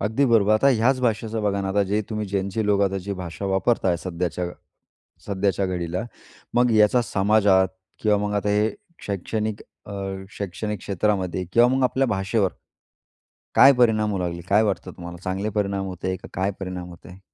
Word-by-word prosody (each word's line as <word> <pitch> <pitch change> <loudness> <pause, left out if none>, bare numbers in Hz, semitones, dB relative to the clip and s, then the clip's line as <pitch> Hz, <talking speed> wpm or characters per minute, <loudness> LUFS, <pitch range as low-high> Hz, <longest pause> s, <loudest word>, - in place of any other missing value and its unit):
अगदी 110 +7 +1
बरोबर. 110 -4 +4
आता 110 +6 +4
ह्याच 130 +1 +3
भाषेचं 115 -2 -1
बघा 100 -1 0
ना, 95 - -2
आता 100 +1 +2
जे 105 +1 +2
तुम्ही 105 -1 -2
ज्यांचे 100 +2 -1
लोक 100 -1 +3 0.4
भाषा 90 +1 -6
वापरताय 95 -1 +1
सध्याच्या 90 0 -2 0.8
सध्याच्या 100 -1 0
घडीला. 90 -1 -2 0.5
मग 120 0 +4
याचा 110 +3 +5
समाजात 100 -3 +3 0.3
किंवा 105 -1 +3
मग 105 - -3
आता 105 0 0
हे 105 +2 +2 0.4
शैक्षणिक 105 +2 -3 0.2
अ, - - -10 0.4
शैक्षणिक 100 +2 -4
क्षेत्रामध्ये 95 -1 -1
किंवा 120 +3 +6
मग 130 +1 +1
आपल्या 130 +1 +2
भाषेवर, 95 -2 0 1.1
काय 135 - +9
परिणाम 110 -3 +3
होऊ 95 - -2
लागले? 85 -1 -3
काय 105 +2 +5
वाटतं 100 -3 -2
तुम्हाला? 85 0 -9
चांगले 95 +3 -2
परिणाम 100 -1 0
होताहेत 95 0 -3
का - - -10
काय 95 +2 0
परिणाम 90 -2 -5
होताहेत? 90 +2 -13
100 Hz, 160 wpm, -23 LUFS, 95-110 Hz, 1.1 s, काय